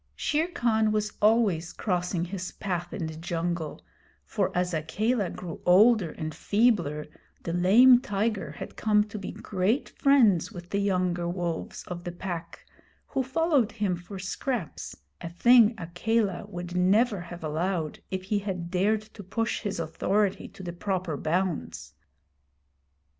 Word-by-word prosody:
Shere 315 +2 0
Khan 220 -9 +1
was 215 0 -1
always 210 -6 +3
crossing 180 -3 -1
his 185 0 -5
path 180 -3 -3
in 165 - -3
the 160 0 -6
jungle, 165 -1 -3 0.4
for - - -1
as 180 0 0
Akela 200 +7 0
grew 170 -2 -7
older 205 +1 +5
and 155 0 -5
feebler 200 -10 +1 0.4
the 170 - -3
lame 230 +8 +7
tiger 215 -4 -2
had - - -8
come 210 -1 +3
to 210 0 -8
be 195 - -5
great 200 +7 -1
friends 230 - +3
with 175 -4 -10
the 200 - +1
younger 180 -3 0
wolves 175 -2 -4
of 175 -1 -7
the 175 - -4
Pack, 175 -1 -6 0.4
who 270 - -1
followed 265 -4 +1
him 205 -5 0
for 175 +3 -9
scraps, 190 - -4 0.3
a 170 - -5
thing 235 +5 +5
Akela 190 +3 -1
would 175 0 -7
never 200 +3 +3
have 175 -1 -9
allowed 160 +1 -2
if 190 -1 -3
he 205 +2 0
had 180 -4 -4
dared 205 +4 +1
to 205 - -9
push 225 +4 -2
his 205 -4 -3
authority 190 +5 0
to 190 - -12
the 175 -1 -5
proper 185 -3 -2
bounds. 170 +3 -2
190 Hz, 145 wpm, -27 LUFS, 175-215 Hz, 0.4 s, lame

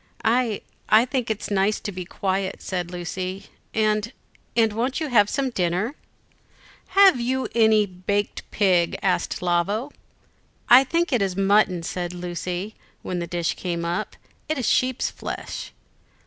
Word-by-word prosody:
"I 230 -2 +2 0.3
I 220 +3 +6
think 255 -2 -2
it 215 -1 -3
nice 200 +2 +2
to 205 - -4
be 180 -1 -6
quiet," 190 +1 -2
said 180 -2 -3
Lucy; 185 +2 -5 0.2
"and 215 0 +1 0.5
and 225 -2 +4
won't 245 +4 -1
you 310 -2 -2
have 210 -5 +4
some 270 -2 -1
dinner?" 185 +4 0 1.0
"Have 390 -9 +7
you 260 +2 0 0.6
baked 205 0 0
a - - -13
pig?" 185 -3 +2
asked 185 -1 0
Lavo. 195 - 0 0.8
"I 250 +2 +9
think 335 +6 0
this 245 -6 +1
is 190 -2 0
mutton," 195 -3 +3
said 175 +1 -4
Lucy, 180 +3 -4 0.3
when 180 -1 -3
the 170 - -3
dish 170 -1 -1
came 170 -2 -3
up, 170 +1 -2 0.3
"it 310 - 0
is 250 - -1
sheep's 255 0 +1
flesh." - - -6
200 Hz, 150 wpm, -24 LUFS, 180-235 Hz, 1.0 s, I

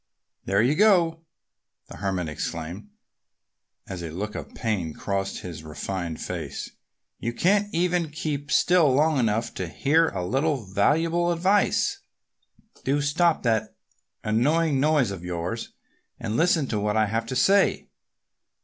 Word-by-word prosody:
"There 100 +3 +2
you 130 +4 +3
go!" 170 -4 +3 0.6
the - - -11
Hermit 95 -4 -2
exclaimed 85 +6 -5 1.0
as 95 -2 -6
a 85 - -5
look 105 +6 -5
of - - -8
pain 100 -9 -2
crossed 100 -1 -3
his 85 -4 -7
refined 85 +1 -5
face. - - -5 0.5
"You 115 - -3
can't 205 +8 +2
even 175 -1 +1
keep 145 -2 -4
still 175 -5 +4
long 150 +2 +3
enough 115 -1 0
to 95 - -4
hear 150 - +2
a 90 -2 -4
little 135 - 0
valuable 165 - +1
advice. 200 - +2 0.8
Do 140 +2 +1
stop 160 +4 +2
that 110 -2 0 0.5
annoying 140 +7 +2
noise 145 -6 +2
of 95 -3 -7
yours 90 +5 -4 0.5
and 110 -1 -3
listen 165 0 +3
to 105 - -1
what 105 +1 0
I 110 - +4
have 115 +2 -2
to 130 - -4
say!" 195 +10 +3
125 Hz, 140 wpm, -25 LUFS, 100-165 Hz, 1.0 s, still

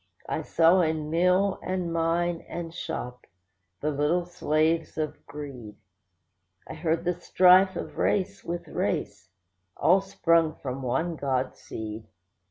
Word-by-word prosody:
I - - -2
saw 170 +3 +4
in 155 -2 -1
mill, 180 +4 +2
and 180 -2 -2
mine, 165 +1 0
and 165 -1 -6
shop, 125 -8 -6 0.5
the 150 - 0
little 150 +5 +1
slaves 160 -2 0
of 155 -1 -3
greed; 135 -7 -8 0.9
I - - -7
heard 165 +1 -1
the 180 - +2
strife 185 +2 +5
of - - -6
race 195 0 0
with 170 0 -5
race, - - -3 0.5
all 185 +3 +4
sprung 165 -4 +2
from 130 0 -5
one 135 +7 -1
God 130 -2 -1
seed. 110 0 -7
165 Hz, 130 wpm, -27 LUFS, 150-175 Hz, 0.9 s, strife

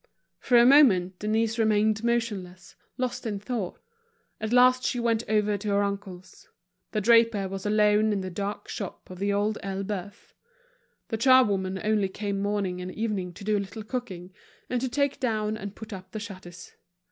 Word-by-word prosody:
For 245 - +3
a 235 - +7
moment, 195 -10 +5
Denise 220 +2 0
remained 215 0 +2
motionless, 205 -6 -2 0.2
lost 250 -2 -3
in 205 -2 -2
thought. 210 -3 -4 0.6
At 220 0 -3
last 255 +1 +5
she 245 - -1
went 230 -1 +1
over 210 -1 +1
to 210 - -6
her 200 0 +2
uncle's. 195 -2 -6 0.4
The 215 - -1
draper 230 -2 +4
was 195 +1 -5
alone 210 0 +3
in 200 -2 -1
the 185 0 -5
dark 200 +3 -4
shop 195 -2 -7
of 180 - -9
The 200 +1 0
Old 205 +1 0
Elbeuf. 195 0 -5 0.8
The 225 - -2
charwoman 205 -7 +3
only 210 -2 +1
came 200 0 -3
morning 200 -3 -1
and 180 0 -5
evening 205 -5 -3
to 190 - -11
do 215 +1 +1
a - - +1
little 215 +3 -7
cooking, 195 -7 -6 0.4
and 250 -1 0
to 260 - -1
take 280 +2 0
down 215 -5 -1
and 200 -2 -7
put 220 -1 -9
up 190 -1 -10
the 215 - -4
shutters. 185 -5 -10
210 Hz, 175 wpm, -27 LUFS, 195-225 Hz, 0.8 s, a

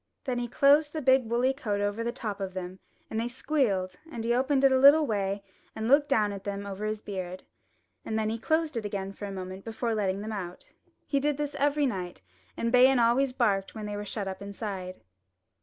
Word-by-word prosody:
Then 250 -3 -2
he 240 - -2
closed 285 +4 +4
the 315 - -3
big 260 -3 +4
woolly 245 +3 +2
coat 215 -7 -2
over 205 +2 -1
the 235 - -1
top 215 -5 -5
of 190 -1 -4
them 185 0 -6 0.3
and 220 - -1
they 230 - -1
squealed; 240 -8 0
and 230 -6 -5
he 235 +1 +1
opened 265 +2 +2
it 270 - +6
a 260 - +4
little 290 +3 +8
way 200 -4 -1 0.3
and 220 0 -3
looked 285 +3 +4
down 210 -6 +2
at 195 -1 -8
them 200 0 -4
over 200 +1 -5
his 215 0 -4
beard, 185 -2 -5 0.6
and 220 - -2
then 220 0 0
closed 315 +2 0
it 230 - -2
again 195 -1 -4
for 205 - -7
a 200 - -5
moment 185 0 -7
before 230 +1 -2
letting 200 -2 -1
them 215 +1 -5
out. 180 -4 -7 0.3
He 280 - +1
did 290 0 0
this 295 -1 -3
every 290 +1 +1
night, 180 - -4 0.3
and 230 - 0
Bayan 255 +1 +6
always 245 +3 +3
barked 205 -7 0
when 215 -1 -5
they 205 0 -4
were 205 - -4
shut 205 -1 -4
up 190 0 -5
inside. 195 -2 -6
220 Hz, 220 wpm, -28 LUFS, 200-265 Hz, 0.6 s, little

